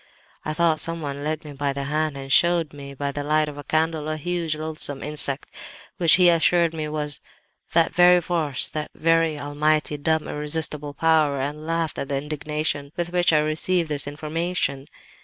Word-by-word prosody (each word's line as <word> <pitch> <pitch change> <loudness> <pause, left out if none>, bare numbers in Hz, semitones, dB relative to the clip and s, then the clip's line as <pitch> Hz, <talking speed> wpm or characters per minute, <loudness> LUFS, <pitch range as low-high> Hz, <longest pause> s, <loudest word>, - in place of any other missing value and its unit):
"I 155 - -3
thought 165 -2 +2
someone 145 -4 -3
led 155 +1 -3
me 150 - -8
by 140 0 -1
the 140 0 -4
hand 150 +1 -1
and 135 0 -2
showed 170 -3 +3
me, 140 -1 -9
by 140 +1 -3
the 145 +1 -4
light 155 +1 +2
of 145 -1 -8
a - - -7
candle, 155 0 0
a 155 - -2
huge, 170 0 -2
loathsome 155 -3 -2
insect, 145 -2 +2 0.5
which 170 -3 +5
he 180 -1 +5
assured 170 0 +3
me 155 -1 -3
was 150 -1 -3 0.5
that 165 -1 +3
very 180 0 +6
force, 165 -6 0
that 150 0 -4
very 165 -1 +2
almighty, 150 +1 0
dumb, 160 +2 0
irresistible 150 -1 -2
Power, 155 -3 +2
and 150 +3 -4
laughed 165 -2 -1
at 140 - -4
the 140 - 0
indignation 150 0 -3
with 175 0 -3
which 175 -1 +3
I 155 -1 +4
received 160 +2 0
this 145 -1 -3
information. 155 -1 -3
155 Hz, 180 wpm, -23 LUFS, 145-165 Hz, 0.5 s, very